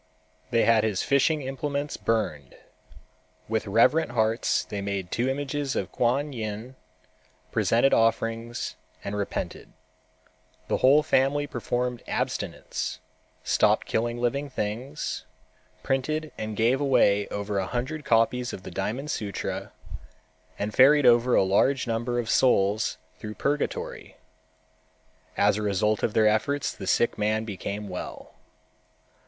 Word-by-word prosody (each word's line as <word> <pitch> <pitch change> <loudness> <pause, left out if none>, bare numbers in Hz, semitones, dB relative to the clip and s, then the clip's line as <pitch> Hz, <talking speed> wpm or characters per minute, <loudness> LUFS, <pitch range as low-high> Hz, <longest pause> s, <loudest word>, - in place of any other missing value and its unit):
They 115 -2 +3
had 115 -2 +4
his 105 -4 0
fishing 145 +2 +2
implements 140 +2 -3
burned. 95 - -2 0.9
With 110 -1 -1
reverent 120 +7 +3
hearts 110 0 +1
they 100 - -5
made 100 -2 -3
two 125 +2 0
images 140 0 -2
of - - -2
Kuan 135 +4 0
Yin, 110 +2 -5 0.8
presented 120 +4 +3
offerings 115 -1 0 0.3
and 100 - -4
repented. 100 -1 -4 1.0
The - - +2
whole 140 +4 +5
family 140 +2 +2
performed 125 -2 -2
abstinence, - - -3 0.5
stopped - - +3
killing 120 +1 -1
living 140 +4 -1
things, 125 +5 -4 0.6
printed 155 +4 -1
and 110 -1 -5
gave 120 +5 +2
away 105 -7 +3
over 100 0 -3
a 95 - -2
hundred 130 +5 -3
copies 120 +1 +2
of 95 - -7
the - - -8
Diamond 125 +10 -3
Sutra, 100 -3 -4 0.9
and 105 +1 -3
ferried 140 +2 +6
over 120 +1 +5
a - - +5
large 130 +8 +2
number 120 +1 -1
of 120 -2 -1
souls 110 -3 +2 0.2
through 105 -1 -7
purgatory. 145 +1 -3 1.2
As 100 0 +3
a - - -2
result 105 +1 +1
of 110 - -1
their 110 - +4
efforts 110 +7 +1
the 95 - -8
sick 120 +4 +2
man 110 +1 0
became 105 0 -5
well. 90 -2 -7
115 Hz, 125 wpm, -26 LUFS, 105-135 Hz, 1.2 s, ferried